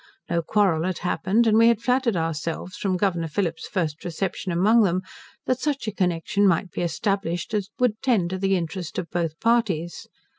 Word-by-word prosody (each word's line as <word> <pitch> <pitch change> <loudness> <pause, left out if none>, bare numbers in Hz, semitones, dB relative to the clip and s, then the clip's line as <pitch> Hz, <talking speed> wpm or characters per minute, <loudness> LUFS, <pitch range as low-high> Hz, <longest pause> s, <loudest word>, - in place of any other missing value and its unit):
No 170 0 +2
quarrel 175 -3 +2
had 185 +1 -1
happened, 200 +6 +2
and 220 -1 +4
we 230 +1 +6
had 235 -2 +4
flattered 250 -1 +1
ourselves, 165 +2 -3
from 190 -2 -1
Governor 175 -4 0
Phillip's 165 -1 -2
first 160 -5 -2
reception 180 +2 -3
among 210 +7 +4
them, 185 -2 +1 0.4
that 255 -1 0
such 280 -2 -2
a - - 0
connection 185 +1 +1
might 180 0 +1
be - - -4
established 175 +1 -2
as 205 -2 -1
would 235 -4 +1
tend 220 -10 +1
to 190 - -3
the 195 0 +2
interest 175 0 -4
of 170 -3 -4
both 165 -2 -2
parties. 205 -8 0
185 Hz, 185 wpm, -24 LUFS, 170-215 Hz, 0.4 s, we